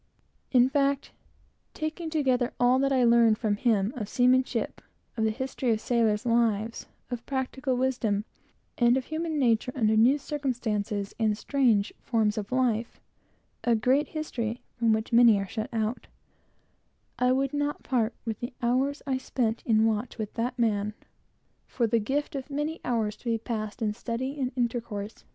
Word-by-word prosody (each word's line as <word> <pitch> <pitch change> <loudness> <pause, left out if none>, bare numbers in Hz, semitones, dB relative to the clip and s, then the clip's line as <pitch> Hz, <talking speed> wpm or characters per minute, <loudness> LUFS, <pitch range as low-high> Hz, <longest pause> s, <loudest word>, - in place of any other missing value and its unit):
In 250 -1 +6
fact, 275 +1 0 0.6
taking 315 +1 -4
together 265 -6 +1
all 245 +1 +4
that 275 0 +1
I 260 -2 +3
learned 235 -2 +5
from 210 -2 0
him 210 -1 +1
of 215 -5 -5
seamanship, 255 +2 +1 0.3
of 220 -1 0
the - - +3
history 260 +2 -3
of 215 - -1
sailors' 225 -1 +1
lives, 230 -2 +1 0.2
of 240 -1 -4
practical 265 -1 -2
wisdom, 235 -5 0 0.5
and 240 +1 +5
of 260 - -3
human 315 0 -3
nature 245 -2 +2
under 220 -4 +2
new 240 +6 +5
circumstances, 230 -8 -2
a 215 -2 +2 2.4
great 260 +6 +2
history 245 -7 -4
from 230 -2 +1
which 220 +2 -1
many 235 -3 +7
are 195 0 -3
shut 220 +3 -4
out, 225 +1 -2 1.1
I 250 0 +3
would 270 +1 +1
not 290 0 -2
part 240 -3 0
with 225 -2 -3
the 240 +1 -5
hours 265 +4 0
I 265 -2 0
spent 235 -3 -1
in 220 -1 +4
the - - +4
watch 220 +3 -2
with 215 -2 -4
that 245 +2 -2
man 210 -3 0 0.7
for 245 - -3
any 230 0 +3
given 270 +7 0 0.6
hours 220 -3 -1
of - - -24
my - - +2
life 225 0 -3
passed 215 0 -4
in 210 -1 0
study 255 +5 -4
and 260 - +1
social 250 -1 -1
intercourse. 225 -3 -5
240 Hz, 155 wpm, -27 LUFS, 220-260 Hz, 2.4 s, many